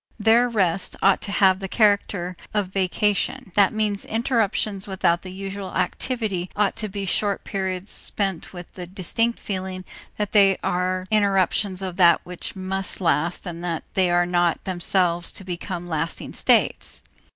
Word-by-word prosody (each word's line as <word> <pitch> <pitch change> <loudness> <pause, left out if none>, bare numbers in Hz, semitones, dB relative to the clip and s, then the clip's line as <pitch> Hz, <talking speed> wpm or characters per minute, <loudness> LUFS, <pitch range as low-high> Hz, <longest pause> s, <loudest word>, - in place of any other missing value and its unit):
Their 230 +3 +4
rest 195 -5 0
ought 195 - +5
to 200 - -4
have 190 -2 +4
the 195 - -4
character 200 -4 +1 0.2
of 205 -3 +1
vacation; 205 +5 0
that 200 -1 +5
means 210 -2 -1
interruptions 215 -4 0
without 175 -3 +1
the 185 - -8
usual 195 0 -6
activity 190 -1 -2
ought 205 -1 +1
to 215 - -3
be 200 0 -4
short 200 +2 0
periods 190 0 -3
spent 195 -5 -3
with 175 -2 -10
the 180 -2 -7
distinct 210 +6 0
feeling 185 -1 -4 0.3
that 210 -1 -2
they 195 -2 +5
are 185 +1 -1
interruptions 195 -2 +2
of 185 -2 -4
that 170 -2 +6
which 180 -1 -6
must 190 0 -3
last 170 -1 0
and 170 -1 -6
that 170 -2 -2
they 185 -2 +3
are 175 0 +3
not 175 -1 +1
themselves 175 -2 +1
to - - -8
become 175 -1 -5
lasting 165 0 -3
states. - - +1
190 Hz, 155 wpm, -23 LUFS, 180-205 Hz, 0.3 s, that